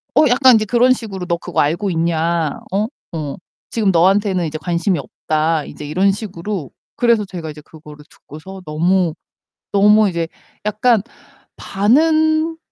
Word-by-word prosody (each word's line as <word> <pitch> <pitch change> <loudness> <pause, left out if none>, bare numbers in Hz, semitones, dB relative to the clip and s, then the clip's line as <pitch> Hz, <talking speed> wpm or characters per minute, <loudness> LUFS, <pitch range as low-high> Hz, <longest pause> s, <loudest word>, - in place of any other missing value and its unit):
어 305 - +5
약간 255 -1 +6
이제 215 -1 +2
그런 245 +3 +4
식으로 200 -7 -6
"너 170 -1 -1
그거 - - -1
알고 175 +7 0
있냐? 165 -1 0
어? 205 +3 0 0.3
어. 145 -3 -4 0.4
지금 215 -4 +1
너한테는 185 +1 +2
이제 155 0 -5
관심이 170 +2 -1
없다." 155 +3 -1
이제 150 - -9
이런 185 +7 +2
식으로 195 - -5 0.3
그래서 235 -4 +2
제가 175 -4 -7
이제 150 0 -10
그거를 150 -1 -14
듣고서 185 +6 -12
너무 170 +2 +1 0.6
너무 210 +1 +5
이제 170 -3 -2 0.4
'약간 215 +2 +2 0.6
반은 315 +9 +2
190 Hz, 295 characters per minute, -18 LUFS, 160-215 Hz, 0.6 s, 약간